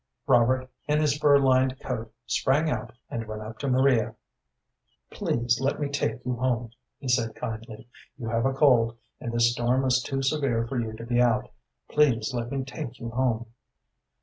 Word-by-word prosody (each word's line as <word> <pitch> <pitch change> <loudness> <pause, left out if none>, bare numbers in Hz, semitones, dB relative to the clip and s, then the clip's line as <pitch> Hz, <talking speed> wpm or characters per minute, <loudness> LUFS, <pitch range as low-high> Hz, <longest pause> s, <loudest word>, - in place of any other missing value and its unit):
Robert, 130 +1 +3 0.2
in 150 0 +2
his 150 -2 +2
fur 145 -1 +5
lined 130 -1 +3
coat, 115 -3 -4
sprang 150 +4 +1
out 120 - -3 0.2
and 115 -1 -4
went 110 0 -6
up 110 +1 -9
to 140 - -3
Maria. 130 -3 +3 1.0
"Please 120 +1 0
let 140 +2 0
me 145 -1 -1
take 120 -5 -2
you 125 -1 -1
home," 120 -2 -1 0.3
he 135 - -8
said, 120 -3 +1
kindly. 115 -1 -6 0.3
"You 120 -4 -6
have 115 +3 +1
a - - +1
cold, 120 -5 +4 0.2
and 120 - -4
this 115 0 +3
storm 125 +2 +1
is 130 0 +3
too 135 0 -3
severe 135 -5 +1
for 120 +2 -3
you 110 -1 -4
to 115 +1 -8
be 120 +1 +2
out. 120 -2 +2 0.4
Please 125 -7 +2
let 120 -1 -2
me 135 -1 -1
take 130 -2 -7
you 115 -1 -5
home." 120 -2 0
125 Hz, 180 wpm, -26 LUFS, 115-135 Hz, 1.0 s, fur